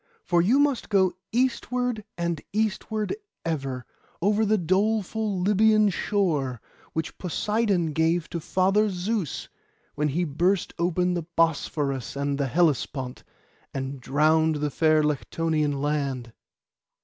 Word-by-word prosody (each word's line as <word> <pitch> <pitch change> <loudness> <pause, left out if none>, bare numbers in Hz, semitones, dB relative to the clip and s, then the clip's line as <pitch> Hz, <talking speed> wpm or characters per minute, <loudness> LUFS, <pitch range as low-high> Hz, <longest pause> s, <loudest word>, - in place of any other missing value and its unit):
For 175 -2 +3
you 220 +10 +3
must 285 -3 +1
go 190 -4 +3 0.2
eastward 245 -1 0
and 170 -3 -1
eastward 215 - -1 0.3
ever, 135 -6 -3 0.3
over 210 +3 +2
the 215 +1 +3
doleful 205 +2 0
Lybian 210 +1 +4
shore, 155 - 0 0.3
which 160 0 -3
Poseidon 195 -2 0
gave 160 +2 +1
to 170 - -2
Father 195 +6 +2
Zeus, 190 - -2 0.5
when 150 +1 0
he 160 +5 0
burst 175 +5 0
open 180 +1 +1
the 170 -2 -3
Bosphorus 145 -5 0
and 140 0 -1
the 140 - +1
Hellespont, 135 -4 0 0.5
and 135 0 -4
drowned 155 +4 +3
the 150 0 -1
fair 155 0 +3
Lectonian 150 0 0
land. 135 -5 -2
170 Hz, 120 wpm, -26 LUFS, 150-205 Hz, 0.5 s, Lybian